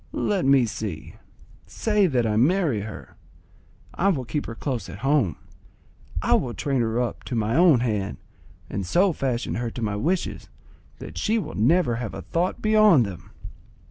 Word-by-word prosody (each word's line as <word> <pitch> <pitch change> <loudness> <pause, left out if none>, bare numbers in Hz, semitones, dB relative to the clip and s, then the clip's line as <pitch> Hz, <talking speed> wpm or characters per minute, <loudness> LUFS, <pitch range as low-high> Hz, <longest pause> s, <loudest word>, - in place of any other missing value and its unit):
Let 200 -6 0
me 135 -2 +5
see: 105 -7 -6 0.5
say 210 -3 +1
that 125 -7 +1
I 110 -1 0
marry 145 - +2
her; 110 0 -9 0.8
I 195 - 0
will 145 -10 +1
keep 145 +6 -3
her 115 - -6
close 125 -1 -4
at - - -8
home, 135 - +2 0.9
I - - +2
will 120 -2 +1
train 135 -3 0
her 115 +1 0
up 125 -1 -3
to 125 - -4
my 110 +1 0
own 165 -7 +5
hand, 105 - -2 0.5
and 100 - -4
so 180 - +2
fashion 130 -5 -2
her 120 0 -2
to 120 - -7
my 105 -2 -1
wishes 170 - -2 0.5
that - - -8
she 225 +1 +1
will 215 - -4
never 125 +2 +2
have 115 -3 -5
a - - -7
thought 175 +3 -2
beyond 215 - +5
them! 90 -4 -9
125 Hz, 175 wpm, -24 LUFS, 110-170 Hz, 0.9 s, me